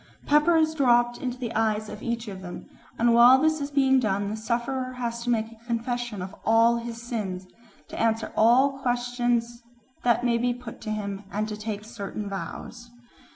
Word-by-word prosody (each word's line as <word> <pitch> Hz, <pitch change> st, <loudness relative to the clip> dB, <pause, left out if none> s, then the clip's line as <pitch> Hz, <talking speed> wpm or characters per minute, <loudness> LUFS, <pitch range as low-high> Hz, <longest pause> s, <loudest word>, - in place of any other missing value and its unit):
Pepper 300 Hz, +4 st, +4 dB
is 315 Hz, 0 st, +2 dB
dropped 240 Hz, -4 st, +3 dB
into 250 Hz, -1 st, -3 dB
the 240 Hz, -2 st, -4 dB
eyes 215 Hz, -1 st, 0 dB
of 210 Hz, -, -8 dB
each 235 Hz, -1 st, -3 dB
of 190 Hz, -2 st, -7 dB
them, 175 Hz, -1 st, -8 dB, 0.3 s
and 235 Hz, 0 st, +3 dB
while 245 Hz, +3 st, +8 dB
this 315 Hz, +1 st, +2 dB
is 280 Hz, -, -3 dB
being 265 Hz, -2 st, +3 dB
done 200 Hz, -3 st, 0 dB
the -, -, -2 dB
sufferer 250 Hz, +3 st, -2 dB
has 235 Hz, -2 st, -4 dB
to 240 Hz, -, -3 dB
make 225 Hz, -2 st, +2 dB
a 230 Hz, 0 st, -18 dB
confession 235 Hz, -3 st, -2 dB
of 190 Hz, +2 st, -8 dB
all 230 Hz, +1 st, +4 dB
his 235 Hz, 0 st, -6 dB
sins, 210 Hz, -6 st, -4 dB, 0.4 s
to -, -, -8 dB
answer 225 Hz, 0 st, 0 dB
all 260 Hz, +5 st, +4 dB
questions 245 Hz, -1 st, -1 dB, 0.4 s
that 240 Hz, 0 st, +2 dB
may 235 Hz, -1 st, +2 dB
be 245 Hz, 0 st, 0 dB
put 245 Hz, -2 st, -10 dB
to 220 Hz, -, -6 dB
him, 205 Hz, -2 st, -4 dB
and 210 Hz, +1 st, -1 dB
to 215 Hz, -, -4 dB
take 210 Hz, 0 st, -5 dB
certain 215 Hz, -2 st, -6 dB
vows. 235 Hz, +4 st, -7 dB
235 Hz, 190 wpm, -26 LUFS, 215-245 Hz, 0.4 s, while